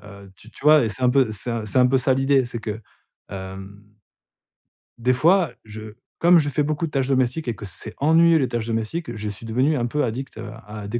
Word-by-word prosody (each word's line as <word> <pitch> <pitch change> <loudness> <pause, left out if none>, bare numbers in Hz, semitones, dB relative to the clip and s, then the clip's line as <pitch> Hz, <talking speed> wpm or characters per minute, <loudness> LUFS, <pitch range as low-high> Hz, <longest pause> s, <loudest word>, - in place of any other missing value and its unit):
Voilà, 100 -1 -13
heu 95 -1 -15
tu 115 - -15
tu 125 - -15
vois? 150 -4 +6
Et - - 0
c'est 130 +4 -6
un 125 - +4
peu 130 -4 +2
c'est 110 +3 -5
c'est 115 - 0
un 125 - +6
peu 135 +1 +2
ça 130 0 +2
l'idée, 135 0 +2
c'est 120 -1 -6
que 110 0 -5 0.5
hem, 95 +1 -9 1.2
des 125 +2 +1
fois, 165 +2 +3
je 110 0 -10 0.3
comme 170 0 +6
je 145 -1 0
fais 145 +1 0
beaucoup 155 +2 -1
de - - -11
tâches 135 -1 0
domestiques 130 +2 0
et 115 - -2
que 105 - -9
c'est 100 +4 -8
ennuyeux 165 +3 +4
les 130 - +1
tâches 115 -2 -3
domestiques, 115 +4 -3
je 105 0 -4
suis 105 +3 -9
devenu 130 +7 +1
un 120 - -1
peu 150 +5 -1
addict, 125 +1 -4
heu, 115 -1 -7 0.2
à 105 -1 -8
des 120 +3 -3
120 Hz, 240 wpm, -22 LUFS, 110-140 Hz, 1.2 s, vois